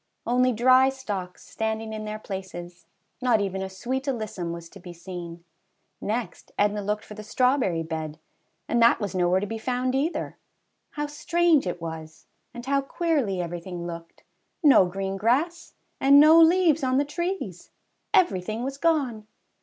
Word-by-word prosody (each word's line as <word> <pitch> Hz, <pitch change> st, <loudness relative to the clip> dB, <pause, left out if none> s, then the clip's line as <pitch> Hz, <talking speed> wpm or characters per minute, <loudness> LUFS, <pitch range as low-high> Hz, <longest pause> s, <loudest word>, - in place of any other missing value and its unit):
Only 250 Hz, +1 st, +3 dB
dry 255 Hz, +3 st, +5 dB
stalks 205 Hz, -9 st, -6 dB
standing 220 Hz, 0 st, -3 dB
in 215 Hz, 0 st, -5 dB
their 215 Hz, 0 st, -4 dB
places, 180 Hz, -4 st, -8 dB, 0.2 s
— -, -, -20 dB
^not 240 Hz, -4 st, +3 dB
even 195 Hz, -1 st, -2 dB
a 190 Hz, -, -4 dB
sweet 255 Hz, +8 st, -4 dB
alyssum 215 Hz, -10 st, -3 dB
was 170 Hz, 0 st, -7 dB
to 195 Hz, -, -13 dB
be 175 Hz, -1 st, -10 dB
seen. 170 Hz, -1 st, -8 dB, 0.6 s
Next, 220 Hz, -3 st, -4 dB
Edna 205 Hz, 0 st, +1 dB
looked 210 Hz, +1 st, -2 dB
for -, -, -10 dB
the 215 Hz, -, -8 dB
strawberry 230 Hz, -6 st, +1 dB
bed, 160 Hz, -1 st, -5 dB, 0.5 s
and 235 Hz, -, +1 dB
that 235 Hz, +1 st, +5 dB
was 200 Hz, -4 st, -3 dB
nowhere 180 Hz, 0 st, +2 dB
to 200 Hz, -, -2 dB
be 225 Hz, +2 st, -5 dB
found 255 Hz, +2 st, -1 dB
either. 285 Hz, +6 st, -2 dB, 0.6 s
How 295 Hz, 0 st, -2 dB
strange 330 Hz, -, +2 dB
it 175 Hz, -, -3 dB
was 160 Hz, -1 st, -8 dB, 0.3 s
and 240 Hz, 0 st, -9 dB
how 275 Hz, +1 st, +1 dB
queerly 275 Hz, -, -1 dB
every 175 Hz, 0 st, -4 dB
thing 175 Hz, -1 st, -6 dB
looked! 170 Hz, -1 st, -9 dB, 0.4 s
No 270 Hz, -11 st, +7 dB
green 195 Hz, +1 st, -4 dB
grass, 275 Hz, -, 0 dB, 0.2 s
and 275 Hz, +1 st, +7 dB
no 310 Hz, +2 st, +8 dB
leaves 330 Hz, -3 st, +4 dB
on 260 Hz, 0 st, +2 dB
the 285 Hz, -, +2 dB
trees! 340 Hz, -, -4 dB, 0.4 s
Everything 215 Hz, -, +1 dB
was 275 Hz, +1 st, -4 dB
gone 270 Hz, -10 st, 0 dB
220 Hz, 165 wpm, -25 LUFS, 185-270 Hz, 0.6 s, no